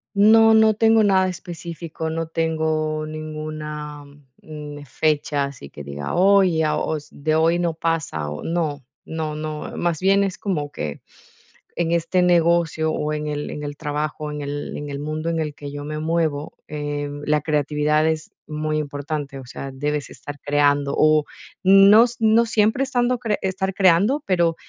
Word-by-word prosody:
No, 220 +2 +6
no 220 0 +5
tengo 225 +1 +4
nada 190 -2 +4
específico. 170 -2 -6
No 165 0 -3
tengo 155 -1 -1
ninguna, 155 -1 -6 0.4
mm, 150 -1 -8
fechas 145 -1 -1
y 70 - -9
que 75 - -10
diga: 70 0 -5
"Hoy, 185 -3 +4
a 155 - +1
os 155 -1 -3
de 155 +2 -1
hoy 165 +2 +3
no 170 -2 0
pasa", 160 - -2
o 75 0 -6
no, 155 -4 -2 0.2
no, 160 -1 -4
no. 155 0 -5
Más 170 -3 0
bien 195 +1 +3
es 195 -2 -2
como 150 -8 -2
que 75 - -5 0.7
en 170 -1 0
este 170 +2 +1
negocio 170 -2 +2
o 150 0 -2
en 150 0 -3
el 150 0 -3
en 150 - -6
el 145 0 -6
trabajo, 150 0 -3
en 150 0 -5
el 145 0 -5
en 145 0 -6
el 140 0 -5
mundo 155 +2 -3
en 165 -1 -1
el 155 -2 -2
que 145 -1 -8
yo 145 0 -6
me 155 0 -4
muevo, 160 -2 -1
em, 145 -1 -4
la 150 0 +2
creatividad 150 +1 +1
es 160 0 -2 0.2
muy 155 0 -2
importante. 145 -1 -4
O 130 - -10
sea, 135 +2 -7
debes 145 +2 -3
estar 145 0 -9
creando, 145 -1 +2
o, 155 -1 +4 0.4
no 195 +4 +8
s 240 -1 -6
no 225 +1 +4
siempre 220 +3 +2
estando 250 -2 0
cre 220 -4 -1
estar 190 0 -1
creando, 195 - +3
pero, 170 -3 +2
155 Hz, 170 wpm, -22 LUFS, 145-175 Hz, 0.7 s, no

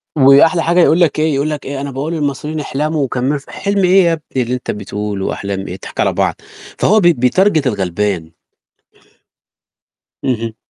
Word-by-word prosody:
وأحلى 150 +4 +5
حاجة 170 +2 +2
يقول 170 -1 +4
لك 155 -2 +2
إيه، 155 0 +1
يقول 140 +3 0
لك 150 -2 -5
إيه، 140 0 -4
أنا 140 0 -5
باقول 140 +5 -4
للمصريين 150 0 -3
احلَموا 150 +1 -2
وكمّلوا 130 +2 -1
ف 140 - -20
حِلم 200 -1 -1
إيه 185 +1 +5
يا 170 -1 +2
ابني 145 -5 -3
اللي 120 - -4
أنت 125 - -3
بتقوله، 105 -1 -4
وأحلام 100 -1 -3
إيه؟ - - -5
إحنا - - -6
هنضحَك - - -11
على - - +2
بعض. - - 0 0.4
فهو 215 +2 +4
بي 175 -3 +4
بيتارجت 155 +5 +2
الغَلبان. 95 -5 -2 1.9
اهم. 115 -3 -2
140 Hz, 180 wpm, -16 LUFS, 120-160 Hz, 1.9 s, وأحلى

